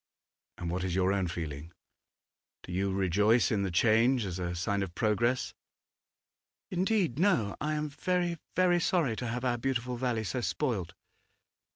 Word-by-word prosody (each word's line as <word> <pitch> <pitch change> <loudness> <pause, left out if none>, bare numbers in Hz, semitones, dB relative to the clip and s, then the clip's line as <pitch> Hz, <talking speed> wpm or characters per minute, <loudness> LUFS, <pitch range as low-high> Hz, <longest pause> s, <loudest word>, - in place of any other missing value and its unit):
'And 85 -1 -4
what 90 +1 -2
is 90 -2 -1
your 95 +1 +2
own 95 -2 0
feeling? 80 -2 -5 0.9
Do - - -9
you 95 +2 0
rejoice 100 +5 +3
in 105 -3 +1
the 95 - 0
change 115 +6 +3
as 95 -1 -4
a 90 -1 -3
sign 100 +3 -1
of 90 -3 -4
progress?' 115 +5 +1 1.2
'Indeed, 180 - +1
no. 165 - +2
I 155 +1 0
am 150 0 -1
very, 175 +2 -1 0.2
very 180 -1 +4
sorry 165 -9 +1
to 125 - -3
have 125 +2 -3
our 120 -1 +1
beautiful 125 -1 -1
valley 120 -3 -1
so 125 +4 -2
spoilt. 110 - -2
115 Hz, 160 wpm, -30 LUFS, 95-135 Hz, 1.2 s, very